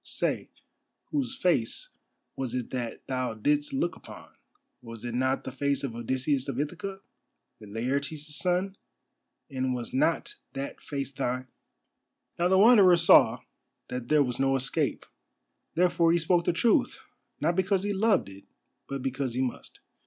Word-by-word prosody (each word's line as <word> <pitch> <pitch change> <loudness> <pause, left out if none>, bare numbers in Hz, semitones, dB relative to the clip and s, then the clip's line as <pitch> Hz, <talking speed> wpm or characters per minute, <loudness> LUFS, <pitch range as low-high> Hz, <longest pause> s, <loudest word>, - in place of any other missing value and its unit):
Say, - - -2 0.6
whose 270 -3 -1
face 170 - 0 0.4
was 130 -2 -3
it 125 -2 -3
that 120 -3 -4
thou 130 -3 -2
didst 145 +6 +1
look 170 +6 -1
upon—was 115 -2 -14
it 120 - -4
not 130 +2 0
the 130 - -5
face 140 +1 -1
of 135 -4 -3
Odysseus 130 +3 -1
of 135 -2 -3
Ithaca, 180 +6 -4 0.6
Laertes' 140 +8 -3
son, 185 +3 0 0.7
and 130 -1 -1
was 120 -1 -6
not 160 +5 0 0.2
that 135 +1 -5
face 140 -2 -4
thine?" 130 -2 -3 0.9
Now 175 - +3
the 190 +1 +4
Wanderer 200 -4 +7
saw 145 -8 +6 0.5
that 125 -1 -5
there 150 -1 +5
was 125 -1 -3
no 135 0 +3
escape. 135 0 -1 0.7
Therefore 170 -1 +3
he 170 - +4
spoke 170 +1 +2
the - - +3
truth, 220 +5 +2 0.4
not 165 +3 +1
because 190 +1 +1
he 205 0 -1
loved 205 - +2
it, 100 0 -13 0.4
but 140 -2 -4
because 130 -2 -2
he 130 - 0
must. 125 - -6
140 Hz, 145 wpm, -28 LUFS, 125-175 Hz, 0.9 s, Wanderer